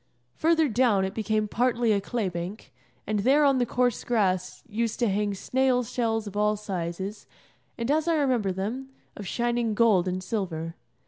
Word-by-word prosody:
Further 320 Hz, -1 st, +3 dB
down 225 Hz, -5 st, +3 dB
it 190 Hz, -, -4 dB
became 215 Hz, -1 st, 0 dB
partly 240 Hz, +1 st, +1 dB
a 200 Hz, -1 st, +2 dB
clay 220 Hz, 0 st, -2 dB
bank, 175 Hz, -, -6 dB, 0.3 s
and 210 Hz, 0 st, -1 dB
there 275 Hz, +8 st, +4 dB
on 275 Hz, -2 st, +4 dB
the 245 Hz, -, +1 dB
coarse 245 Hz, -2 st, +1 dB
grass 190 Hz, -6 st, 0 dB
used 230 Hz, 0 st, -2 dB
to 240 Hz, -, +1 dB
hang 205 Hz, +1 st, 0 dB
snail 255 Hz, +4 st, +1 dB
shells 225 Hz, -1 st, -1 dB
of 205 Hz, -1 st, -8 dB
all 210 Hz, 0 st, +2 dB
sizes, 190 Hz, 0 st, -5 dB, 0.5 s
and, 235 Hz, +3 st, -1 dB
as 310 Hz, +2 st, +1 dB
I 335 Hz, -, +3 dB
remember 255 Hz, -9 st, +1 dB
them, 220 Hz, +9 st, -4 dB, 0.3 s
of 205 Hz, -, -7 dB
shining 235 Hz, -1 st, 0 dB
gold 210 Hz, -5 st, +4 dB
and 185 Hz, 0 st, -2 dB
silver. 170 Hz, -6 st, -3 dB
215 Hz, 175 wpm, -27 LUFS, 195-245 Hz, 0.5 s, there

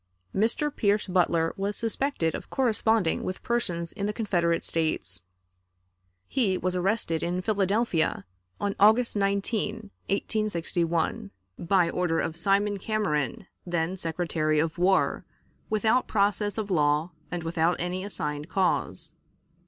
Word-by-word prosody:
Mr. 235 Hz, +8 st, +1 dB
Pierce 205 Hz, -1 st, +2 dB
Butler 170 Hz, -3 st, +2 dB
was 200 Hz, +1 st, -2 dB
suspected 230 Hz, -, 0 dB
of -, -, -6 dB
corresponding 225 Hz, -7 st, +2 dB
with 185 Hz, -, -5 dB
persons 175 Hz, -9 st, -1 dB
in 200 Hz, -, -2 dB
the 210 Hz, -, -1 dB
Confederate 175 Hz, -7 st, 0 dB
States. 155 Hz, -, -1 dB, 1.1 s
He 215 Hz, -9 st, +1 dB
was 185 Hz, 0 st, -1 dB
arrested 180 Hz, -3 st, 0 dB
in 180 Hz, +1 st, -1 dB
Philadelphia 195 Hz, -, +1 dB, 0.3 s
on 200 Hz, -1 st, -1 dB
August 220 Hz, +4 st, +5 dB
19, 205 Hz, +1 st, -1 dB, 0.2 s
1861, 170 Hz, -, -1 dB, 0.3 s
by 180 Hz, 0 st, +3 dB
order 170 Hz, -2 st, 0 dB
of 160 Hz, -, -2 dB
Simon 200 Hz, +3 st, +1 dB
Cameron, 205 Hz, -1 st, -1 dB, 0.2 s
then 175 Hz, 0 st, -1 dB
Secretary 165 Hz, -3 st, -1 dB
of 160 Hz, +2 st, 0 dB
War, 190 Hz, +2 st, +2 dB, 0.5 s
without 220 Hz, +3 st, +2 dB
process 205 Hz, 0 st, +1 dB
of 210 Hz, -2 st, -3 dB
law 150 Hz, 0 st, +2 dB, 0.2 s
and 175 Hz, -2 st, -4 dB
without 165 Hz, +1 st, +1 dB
any 180 Hz, +2 st, -2 dB
assigned 150 Hz, -6 st, -4 dB
cause. 190 Hz, 0 st, 0 dB
185 Hz, 120 wpm, -27 LUFS, 165-210 Hz, 1.1 s, August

